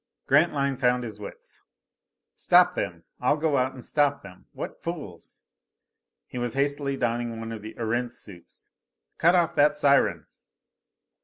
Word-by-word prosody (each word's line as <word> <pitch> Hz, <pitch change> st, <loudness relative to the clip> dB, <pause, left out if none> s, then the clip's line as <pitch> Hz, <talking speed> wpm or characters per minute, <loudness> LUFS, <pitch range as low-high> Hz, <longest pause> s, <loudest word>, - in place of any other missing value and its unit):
Grantline 140 Hz, -2 st, +2 dB
found 125 Hz, -1 st, +2 dB
his 110 Hz, -3 st, -7 dB
wits. 100 Hz, -, -11 dB, 0.7 s
"Stop -, -, +5 dB
them! 85 Hz, -1 st, -4 dB, 0.2 s
I'll 130 Hz, +4 st, +2 dB
go 150 Hz, -2 st, +1 dB
out 130 Hz, +1 st, 0 dB
and 125 Hz, -, -11 dB
stop 145 Hz, -1 st, +1 dB
them! 90 Hz, -2 st, -14 dB
What -, -, -7 dB
fools!" 145 Hz, -, -7 dB, 0.8 s
He 125 Hz, -, -7 dB
was 120 Hz, 0 st, -3 dB
hastily 140 Hz, 0 st, 0 dB
donning 120 Hz, -1 st, -2 dB
one 115 Hz, 0 st, -6 dB
of 110 Hz, -2 st, -6 dB
the 110 Hz, +1 st, -9 dB
Erentz 120 Hz, +1 st, -2 dB
suits. 90 Hz, -5 st, -13 dB, 0.5 s
"Cut 170 Hz, +3 st, +5 dB
off 175 Hz, -2 st, +2 dB
that 150 Hz, +1 st, +3 dB
siren!" 140 Hz, -1 st, +3 dB
125 Hz, 145 wpm, -26 LUFS, 115-145 Hz, 0.8 s, Stop